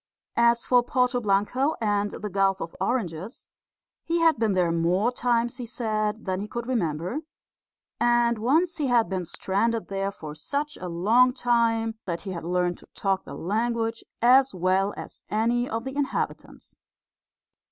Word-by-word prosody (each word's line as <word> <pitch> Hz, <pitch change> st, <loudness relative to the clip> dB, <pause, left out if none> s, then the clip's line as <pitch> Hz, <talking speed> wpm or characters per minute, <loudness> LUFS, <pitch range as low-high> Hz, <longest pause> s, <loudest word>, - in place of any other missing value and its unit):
As 235 Hz, 0 st, +4 dB
for 250 Hz, -1 st, +5 dB
Porto 250 Hz, 0 st, +1 dB
Blanco 215 Hz, +8 st, +1 dB
and 205 Hz, -2 st, +1 dB
the 210 Hz, +1 st, -6 dB
Gulf 195 Hz, 0 st, +2 dB
of 165 Hz, -, -6 dB
Oranges, 195 Hz, -2 st, -2 dB, 0.6 s
he 335 Hz, +1 st, 0 dB
had 325 Hz, -6 st, +4 dB
been 220 Hz, -3 st, +2 dB
there 180 Hz, -2 st, +2 dB
more 175 Hz, +7 st, +2 dB
times, 240 Hz, 0 st, 0 dB
he 245 Hz, -, -5 dB
said, 215 Hz, -2 st, -2 dB
than 185 Hz, -1 st, -1 dB
he 205 Hz, -, -4 dB
could 235 Hz, +2 st, -5 dB
remember; 180 Hz, -, -1 dB, 0.8 s
and 240 Hz, -1 st, +3 dB
once 320 Hz, +10 st, +2 dB
he 295 Hz, -3 st, 0 dB
had 240 Hz, -3 st, +3 dB
been 185 Hz, -2 st, -2 dB
stranded 215 Hz, +6 st, -1 dB
there 195 Hz, 0 st, -1 dB
for 155 Hz, -6 st, -8 dB
such 285 Hz, -, -3 dB
a 180 Hz, -, -6 dB
long 225 Hz, +9 st, +4 dB
time 230 Hz, -3 st, +1 dB
that 170 Hz, -2 st, -3 dB
he 195 Hz, -, -6 dB
had 170 Hz, -3 st, -5 dB
learned 175 Hz, 0 st, 0 dB
to -, -, -18 dB
talk 195 Hz, -1 st, -1 dB
the -, -, -8 dB
language 225 Hz, +4 st, -1 dB, 0.2 s
as 260 Hz, -1 st, +5 dB
well 185 Hz, +2 st, +1 dB
as -, -, -9 dB
any 235 Hz, +3 st, +1 dB
of 225 Hz, +1 st, -3 dB
the 265 Hz, +1 st, -6 dB
inhabitants. 285 Hz, -2 st, -3 dB
225 Hz, 165 wpm, -26 LUFS, 190-245 Hz, 0.8 s, for